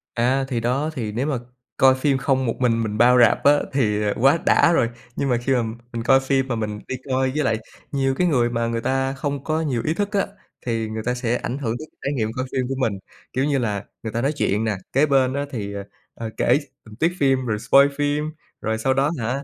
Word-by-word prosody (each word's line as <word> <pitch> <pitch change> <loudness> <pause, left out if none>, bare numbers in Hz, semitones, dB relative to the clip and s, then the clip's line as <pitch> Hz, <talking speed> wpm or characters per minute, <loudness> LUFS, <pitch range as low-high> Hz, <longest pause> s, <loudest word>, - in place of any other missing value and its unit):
À, 130 +3 +2
thì 125 -3 -1
đó, 130 +6 0
thì 115 -7 -3
nếu 125 +7 -2
mà 145 -4 0 0.4
coi 130 0 +6
phim 135 +1 +1
không 130 0 +1
một 115 - -1
mình 115 -3 +2
mình 105 -1 -3
bao 125 +2 +6
rạp 120 -3 +4
á 145 +1 +6
thì, 105 -6 +1
à, 105 -1 +1
quá 135 +6 +5
đã 170 - +5
rồi, 115 -8 +2 0.3
nhưng 140 - -1
mà 120 - +3
khi 120 +3 0
mà 125 -2 +2 0.3
mình 115 -1 -3
coi 135 +3 +5
phim 135 0 0
mà 125 - -1
mình 105 -2 -3
đi 130 - -3
coi 130 0 +1
với 150 - +1
lại 115 -4 +1 0.3
nhiều 135 -1 +1
cái 180 +5 +2
người 125 -6 +2
mà 115 -1 -1
người 115 0 -2
ta 135 +2 0
không 140 0 -3
có 155 +1 0
nhiều 130 -7 -1
ý 155 - +1
thức 205 +3 -2
á 200 -2 +1 0.4
thì 115 -2 -1
người 110 0 -4
ta 125 - 0
sẽ 125 -1 -1
ảnh 125 - -3
hưởng 120 -4 -2
tới 155 - -9 0.2
trải 140 - 0
nghiệm 110 -5 -1
coi 130 - -2
phim 130 -1 -1
của 135 - -2
mình. 110 -7 -1 0.3
Kiểu 130 +2 +1
như 145 -1 +1
là, 105 -5 -2 0.2
người 110 - -4
ta 115 - -1
nói 135 +3 +1
chuyện 110 -8 0
nè, 110 -4 -1 0.2
kế 140 +3 +4
bên 135 -3 +2
á 140 +1 -1
thì, 100 -5 -4
ờ, 100 0 -5 0.3
ờ, 115 -1 -6
kể 125 +4 +3 0.3
tình 110 -1 -12
tiết 165 +9 +1
phim 135 -2 +2
rồi 110 -3 -1
spoil 140 +5 +5
phim, 145 +1 0 0.3
rồi 110 0 -1
sau 130 +4 +1
đó 135 +2 +2
hả, 125 +5 -2
130 Hz, 255 wpm, -22 LUFS, 115-140 Hz, 0.4 s, coi